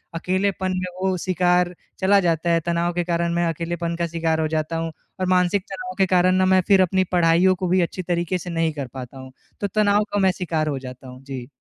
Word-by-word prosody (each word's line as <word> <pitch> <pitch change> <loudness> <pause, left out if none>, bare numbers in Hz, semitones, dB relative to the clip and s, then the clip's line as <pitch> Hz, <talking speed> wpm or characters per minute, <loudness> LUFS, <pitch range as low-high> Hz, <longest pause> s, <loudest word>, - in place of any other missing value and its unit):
अकेलेपन 185 +2 -1
में 185 0 -2
वो 190 0 +1
शिकार 180 -1 +2 0.3
चला 200 +1 +4
जाता 170 -2 0
है, 165 - +3
तनाव 170 0 0
के 175 0 -1
कारण 170 0 -1
मैं 170 0 +1
अकेलेपन 170 +1 -3
का 170 0 -1
शिकार 165 -1 -1
हो 155 - +1
जाता 155 +1 -2
हूँ। 165 0 -3 0.3
और 185 - 0
मानसिक 185 +1 +2
तनाव 245 +6 -6
के 195 - +4
कारण 185 0 +3
ना 185 0 +3
मैं 185 0 +4
फिर 195 -1 +5
अपनी 185 +1 +2
पढ़ाइयों 175 +1 +4
को 185 0 -3
भी 185 +1 +3
अच्छी 175 +2 -2
तरीके 175 0 -1
से 180 - -8
नहीं 165 -1 0
कर 140 -3 -5
पाता 130 0 -8
हूँ। 130 0 -10 0.3
तो 205 - 0
तनाव 205 0 +2
का 205 - +1
मैं 190 -1 +4
शिकार 160 -4 -1
हो 140 -3 -2
जाता 130 0 -10
हूँ। 130 +1 -12
जी। 135 -3 -7
175 Hz, 235 wpm, -22 LUFS, 165-185 Hz, 0.3 s, फिर